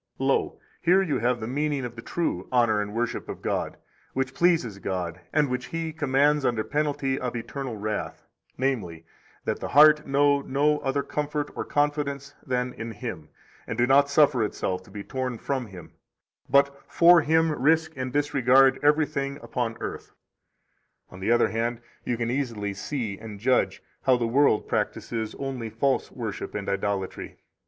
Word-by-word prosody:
16 - - -3
Lo, - - +1 0.2
here 185 +3 +4
you 160 -6 -1
have 120 +1 +1
the 110 - -4
meaning 145 +1 -1
of 120 -1 -7
the 115 - -8
true 115 - -2
honor 115 -4 +3
and 105 0 -4
worship 120 +1 -2
of - - -7
God, - - -2 0.4
which 135 0 -1
pleases 160 - +2
God, 90 -3 -4
and 150 -1 +3
which 125 -1 -3
He 165 -1 -4
commands 145 0 +2
under 120 -4 +1
penalty 145 -2 -1
of 125 -1 -3
eternal 120 +1 -5
wrath, 105 +1 -4 0.3
namely, 100 -12 -2 0.4
that - - -1
the - - -4
heart 150 +1 +6
know 140 +1 +3
no 145 +2 +1
other 140 +1 -1
comfort 150 0 -3
or - - -2
confidence 145 -1 -1
than 125 -1 -1
in 115 0 -6
Him, - - -7 0.4
and - - -4
do 120 - +4
not 140 +2 +4
suffer 140 -4 +4
itself 95 -3 -2
to - - -17
be 100 0 -7
torn 130 -1 -3
from 130 0 -3
Him, 90 -4 -11 0.6
but, 140 +1 +3
for 170 0 +6
Him, 160 +1 +3
risk 160 +3 +2
and 130 -1 -4
disregard 135 -2 +4
everything 145 -2 +1
upon 115 -3 -3
earth. - - -6 1.0
17 - - -31
On 90 - -11
the 95 +5 0
other 120 - +4
hand, 115 +1 -2 0.2
you 120 - -1
can 115 0 -1
easily 115 -7 -2
see 105 0 -4
and 105 -3 -9
judge 125 +4 +1 0.2
how 130 -2 +4
the 120 - -1
world 125 -1 +3
practises 110 -2 -2
only 130 -4 -4
false 135 +4 0
worship 110 -5 -5
and 105 -1 -4
idolatry. 100 -1 -3
130 Hz, 170 wpm, -26 LUFS, 115-145 Hz, 1.0 s, heart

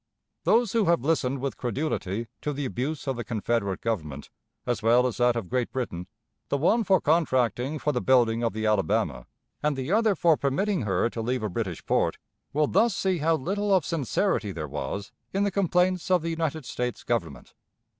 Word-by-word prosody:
Those 230 -2 +3
who 225 -3 +2
have 170 -7 +2
listened 140 -4 0
with 135 0 -3
credulity 120 -5 -2 0.2
to 150 - -2
the 145 0 -3
abuse 135 +4 -3
of 135 -2 -1
the 120 - -3
Confederate 105 -2 -1
Government, 75 -11 -3 0.3
as 120 -2 -1
well 120 +3 +4
as 125 - -1
that 120 -1 +3
of 115 -6 -3
Great 125 +4 -1
Britain, 90 -9 -4 0.4
the 140 - +1
one 220 - +3
for 190 -2 +4
contracting 135 - +1
for 150 - 0
the 125 - -1
building 120 -3 +3
of 115 -1 +1
the 110 0 -3
Alabama 100 - 0 0.3
and 150 -1 +1
the 135 +5 -3
other 215 -1 +3
for 165 -2 +3
permitting 185 +8 0
her 95 +2 +2
to 115 - -4
leave 125 +1 -1
a 105 - -1
British 95 -4 -4
port, - - +1 0.3
will 150 +2 +2
thus 220 +7 +2
see 190 -3 0
how 160 +2 +3
little 200 +8 -1
of 185 -6 +4
sincerity 150 -8 0
there - - -5
was 100 +1 -5 0.2
in 195 +1 +1
the 200 - +1
complaints 185 -1 +1
of 180 -3 +3
the 165 - -1
United 160 -3 -2
States 125 0 -3
Government. - - -3
130 Hz, 195 wpm, -26 LUFS, 115-165 Hz, 0.4 s, well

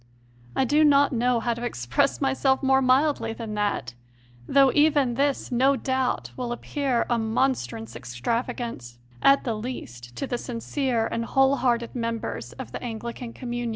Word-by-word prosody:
I 265 - +2
do 295 +4 +4
not 285 -2 +5
know 245 0 +2
how 235 +1 0
to 235 +1 -7
express 120 - 0
myself 270 0 +1
more 265 0 +4
mildly 255 -3 +2
than 225 -2 -6
that; 205 - -1 0.5
though 275 -1 +5
even 290 -4 +3
this, 275 +2 0
no 265 +3 +3
doubt, 260 -1 -1
will 250 -2 -4
appear 260 0 -1
a 240 -1 +1
mon 235 +5 +2
strous 115 - -8
extravagance, 130 - -4 0.2
at 275 0 +5
the 235 - -1
least, 120 - -7
to - - -3
the 245 -2 -3
sincere 245 0 -1
and 230 - -2
whole 270 +3 +3
hearted 240 -2 0
members 230 - -4
of 120 - -8
the - - -6
Anglican 235 +1 -6
communion. 240 -2 -4
240 Hz, 160 wpm, -25 LUFS, 225-270 Hz, 0.5 s, not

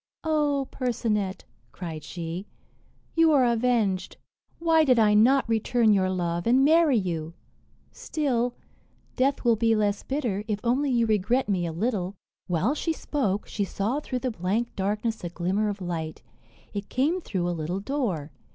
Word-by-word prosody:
"O 295 -4 +1
Percinet," 210 -6 -1 0.3
cried 160 -4 -7
she, 170 +4 -6 0.7
"you 330 -1 +5
are 265 -3 +5
avenged. 230 -5 +1 0.4
Why 325 -1 +4
did 255 -5 +4
I 215 -2 +5
not 250 +6 +4
return 225 0 +2
your 190 -2 +2
love, 175 -1 -2
and 260 +3 +5
marry 315 -3 +5
you! 165 -4 -3 0.6
Still, 250 -5 -1 0.6
death 270 +1 +1
will 235 -1 +5
be 225 +1 +2
less 205 -1 +1
bitter, 240 -8 -2
if 210 -2 -1
only 260 +4 +1
you 240 -2 +2
regret 220 +4 +1
me 185 -4 0
a - - -3
little." 195 +1 -2 0.3
While 180 - +1
she 325 +2 -1
spoke, 210 -11 -1
she 205 - -2
saw 205 +7 -1
through 255 -4 -4
the 255 - +1
blank 215 +5 -2
darkness 210 +3 -2
a 175 - -3
glimmer 185 +5 -1
of 200 -1 -5
light; 165 -6 -4 0.5
it 200 -1 -5
came 310 +8 +1
through 185 - -2
a - - 0
little 170 +3 -3
door. 200 - -2
220 Hz, 160 wpm, -26 LUFS, 185-255 Hz, 0.7 s, you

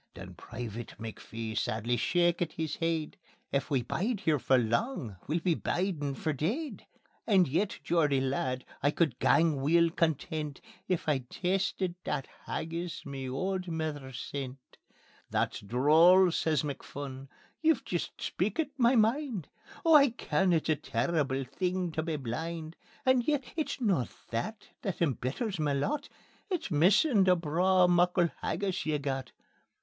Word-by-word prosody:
Then 90 +1 -9
Private 115 +4 -7
McPhee 115 0 -6
sadly 115 +4 0
shakit 175 +6 +1
his 160 -2 -3
heid: 165 +2 -1 0.3
"If 140 - 0
we 135 -4 +1
bide 205 - -1
here 155 -6 +2
for 130 +1 +3
lang, 120 - -1
we'll 160 +3 0
be 175 0 +2
bidin' 160 -5 -1
for 155 +2 -1
deid. 225 - -3 0.4
And 190 -6 +5
yet, 175 +9 0
Geordie 150 -5 +2
lad, 130 -1 -1 0.2
I 145 - +3
could 150 -5 0
gang 160 -3 +4
weel 165 +4 +4
content 155 -2 -1 0.3
If 180 -4 -1
I'd 130 -5 0
tasted 190 0 -1
that 140 -3 -2 0.2
haggis 170 +2 -4
ma 135 -2 -5
auld 185 +7 -2
mither 155 -5 -3
sent." 135 +1 -5 0.7
"That's - - 0
droll," 160 - +5
says 155 -3 +1
McPhun; 140 -1 -6 0.3
"ye've 320 0 +3
jist - - -3
speakit 320 -3 -1
ma 240 +1 +5
mind. 230 - +1 0.4
Oh 325 - +6
I 285 -2 +8
ken 190 -5 0
it's 160 -2 +1
a 155 - +4
terrible 140 0 0
thing 180 +5 -2
tae 155 - -1
be 160 0 -2
blind; 160 +5 -4 0.3
And 260 -2 +3
yet 295 -3 +2
it's 310 -3 -2
no 195 - +1 0.2
that 200 - -4
that 195 -4 -3
embitters 165 - -1
ma 150 -2 +1
lot 285 - -1 0.4
It's 340 - -2
missin' 195 - +4
that 185 -1 +5
braw 180 +3 +3
muckle 175 0 +3
haggis 195 -2 -1
ye've 150 -2 0
got." 135 -2 -3
160 Hz, 145 wpm, -30 LUFS, 135-185 Hz, 0.7 s, I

